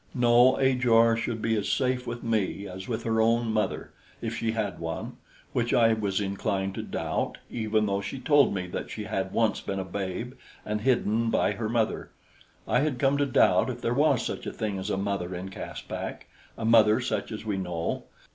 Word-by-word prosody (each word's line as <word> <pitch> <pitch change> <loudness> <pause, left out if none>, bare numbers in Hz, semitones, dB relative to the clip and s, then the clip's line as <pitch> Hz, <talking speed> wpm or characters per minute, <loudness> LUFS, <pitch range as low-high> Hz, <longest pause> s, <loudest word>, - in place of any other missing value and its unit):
No, 120 +1 +5
Ajor 120 -4 +4
should 115 -1 -3
be 115 0 +2
as 100 - -2
safe 130 -1 0
with 120 0 -5
me 110 -3 -1
as 95 +1 -8
with 115 -3 -3
her 110 -1 +1
own 115 0 +2
mother, 110 -1 -1 0.3
if - - -4
she 115 -1 -1
had 110 -3 -2
one, 80 -1 -5 0.4
which 120 -1 +1
I 115 -1 +5
was 105 -3 -1
inclined 95 -1 -1
to - - -4
doubt, - - -3
even 110 -2 0
though 100 -1 0
she 100 +7 -5
told 145 +1 +4
me 95 -2 -2
that 90 - -5
she 110 - -5
had 95 -3 -2
once 115 0 +1
been 95 - -4
a 95 - -3
babe 100 +5 -4 0.3
and 105 0 -2
hidden 115 -2 +2
by - - +2
her 110 -2 -3
mother. 115 -1 0 0.6
I 125 - +3
had 145 -2 0
come 135 +3 +2
to 145 - +2
doubt 130 - +4
if - - -5
there - - 0
was - - +3
such - - -4
a - - -2
thing 105 -3 -3
as 95 +2 -4
a 95 - 0
mother 100 -2 -2
in 90 +2 -5
Caspak, 95 - -6 0.3
a 110 - -3
mother 110 -1 +6
such 125 -1 -2
as 110 0 -6
we 105 -3 -1
know. 90 -3 -3
110 Hz, 205 wpm, -27 LUFS, 100-120 Hz, 0.6 s, mother